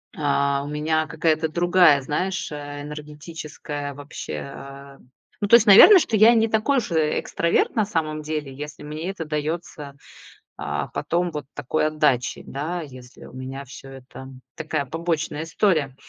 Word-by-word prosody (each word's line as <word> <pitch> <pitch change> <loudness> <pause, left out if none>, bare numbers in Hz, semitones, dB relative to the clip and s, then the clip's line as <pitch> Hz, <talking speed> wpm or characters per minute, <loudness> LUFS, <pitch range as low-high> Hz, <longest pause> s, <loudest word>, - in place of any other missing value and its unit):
а, 140 -1 0
у - - -7
меня 155 +1 -1
какая-то 160 +1 0
другая, 175 -3 +4
знаешь, 180 +8 -3
э, 145 -1 -7
энергетическая 150 -1 -7
вообще, 145 +1 -8 0.2
а 140 0 -11 0.5
Ну - - +2
то 235 - +8
есть, 230 -1 +6
наверное, 210 - +10
что 225 - -1
я 225 +3 +7
не 225 0 +3
такой 225 +6 +1
уж, 225 - -2
э, 155 -2 +1
экстраверт 170 0 0
на 215 - +3
самом 155 -5 -2
деле, 150 -3 -4
если 150 +2 -8
мне 155 +4 -5
это 180 -4 -5
даётся, 150 -1 -4 0.6
а, - - -3
потом 175 +1 -1
вот 150 -2 -5
такой 145 +2 -1
отдачей, 150 -5 0
да. 160 +6 -4
Если 130 -4 -12
у - - -14
меня 130 +2 -7
всё 135 +1 -11
это 130 0 -11 0.3
такая 155 -3 -3
побочная 160 0 -2
история. 165 -5 +1
150 Hz, 155 wpm, -23 LUFS, 145-170 Hz, 0.6 s, наверное